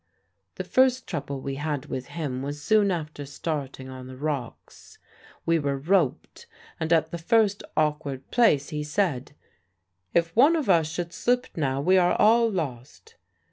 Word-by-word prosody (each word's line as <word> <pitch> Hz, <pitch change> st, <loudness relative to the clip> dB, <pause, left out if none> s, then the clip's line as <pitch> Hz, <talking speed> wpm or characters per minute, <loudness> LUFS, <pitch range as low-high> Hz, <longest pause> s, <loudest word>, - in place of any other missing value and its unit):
"The -, -, -4 dB
first 260 Hz, -1 st, +2 dB
trouble 140 Hz, -5 st, -5 dB
we 135 Hz, 0 st, -4 dB
had 145 Hz, -2 st, -3 dB
with 130 Hz, -3 st, -5 dB
him 140 Hz, -6 st, -4 dB
was 145 Hz, +2 st, -5 dB
soon 210 Hz, +5 st, +3 dB
after 155 Hz, -5 st, -4 dB
starting 140 Hz, -2 st, -5 dB
on 130 Hz, -1 st, -9 dB
the 130 Hz, 0 st, -10 dB
rocks. 140 Hz, -4 st, -6 dB, 0.5 s
We 165 Hz, 0 st, +2 dB
were 140 Hz, -2 st, -1 dB
roped; 160 Hz, -1 st, 0 dB, 0.3 s
and 160 Hz, +1 st, -2 dB
at 160 Hz, -1 st, +3 dB
the 170 Hz, -, -5 dB
first 205 Hz, +3 st, +2 dB, 0.2 s
awkward 150 Hz, -3 st, -1 dB
place 150 Hz, -, +3 dB
he 150 Hz, -1 st, -3 dB
said, 150 Hz, -4 st, -1 dB, 0.8 s
'If 165 Hz, -1 st, +1 dB
one 285 Hz, +8 st, +6 dB
of 310 Hz, -4 st, -1 dB
us 165 Hz, -3 st, +3 dB
should 170 Hz, +1 st, -4 dB
slip 245 Hz, +1 st, 0 dB
now, 135 Hz, -4 st, -1 dB
we 185 Hz, +5 st, +4 dB
are 175 Hz, 0 st, +3 dB
all 230 Hz, +2 st, +5 dB
lost.' 155 Hz, -, -6 dB
155 Hz, 160 wpm, -26 LUFS, 140-190 Hz, 0.8 s, one